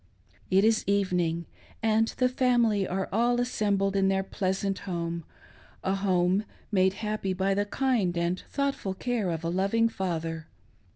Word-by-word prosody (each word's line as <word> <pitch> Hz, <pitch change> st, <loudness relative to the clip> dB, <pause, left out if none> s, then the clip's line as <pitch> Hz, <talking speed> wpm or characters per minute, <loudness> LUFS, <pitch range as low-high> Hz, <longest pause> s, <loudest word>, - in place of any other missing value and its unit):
It 190 Hz, +1 st, +4 dB
is 220 Hz, 0 st, +3 dB
evening, 180 Hz, -4 st, +1 dB, 0.4 s
and 220 Hz, 0 st, +3 dB
the 255 Hz, -, +4 dB
family 240 Hz, -6 st, +2 dB
are 190 Hz, +1 st, -2 dB
all 240 Hz, +3 st, +2 dB
assembled 200 Hz, -5 st, 0 dB
in 195 Hz, -1 st, +3 dB
their 195 Hz, 0 st, +1 dB
pleasant 190 Hz, 0 st, -2 dB
home 170 Hz, -3 st, -4 dB, 0.3 s
— -, -, -27 dB
a 190 Hz, -, +1 dB
home 190 Hz, 0 st, +2 dB, 0.3 s
made 190 Hz, -2 st, +3 dB
happy 210 Hz, -3 st, -1 dB
by 190 Hz, +1 st, +1 dB
the 205 Hz, +1 st, +1 dB
kind 220 Hz, -8 st, +1 dB
and 170 Hz, +2 st, 0 dB
thought 280 Hz, -1 st, 0 dB
ful 190 Hz, -6 st, -5 dB
care 235 Hz, -4 st, -1 dB
of 165 Hz, -1 st, -3 dB
a 165 Hz, -, -1 dB
loving 195 Hz, +6 st, +2 dB
father. 165 Hz, -5 st, -3 dB
195 Hz, 160 wpm, -28 LUFS, 180-220 Hz, 0.4 s, It